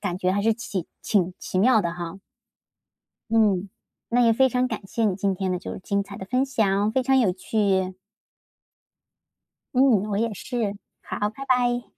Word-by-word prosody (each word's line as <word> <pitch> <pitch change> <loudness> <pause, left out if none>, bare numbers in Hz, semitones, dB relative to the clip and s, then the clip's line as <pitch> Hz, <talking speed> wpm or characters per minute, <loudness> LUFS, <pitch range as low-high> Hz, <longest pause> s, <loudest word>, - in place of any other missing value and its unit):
感 175 - -2
觉 185 0 0
还 200 +2 0
是 225 +1 +3
挺 195 -6 -4 0.2
挺 185 -4 +1
奇 185 - -3
妙 225 +3 +5
的 170 -3 -1
哈。 170 0 -6 1.1
嗯。 205 -4 +3 0.4
那 245 +1 +2
也 230 -1 +5
非 265 +3 +4
常 250 +1 0
感 210 -4 -5
谢 230 +3 -1
你 200 -4 +1
今 195 0 0
天 190 0 -2
的 180 - -1
就 180 - -7
是 - - -7
精 200 +2 -1
彩 200 0 -10
的 190 - -7
分 255 +5 +1
享， 210 -5 +1
非 260 - +2
常 265 +1 +3
有 215 -8 +3
趣。 190 -1 0 1.8
嗯， 255 - +5 0.3
我 200 - 0
也 230 0 0
是。 215 -2 -3 0.3
好， 205 - -2
拜 270 +5 -8
拜。 245 -1 +2
205 Hz, 195 characters per minute, -24 LUFS, 190-240 Hz, 1.8 s, 妙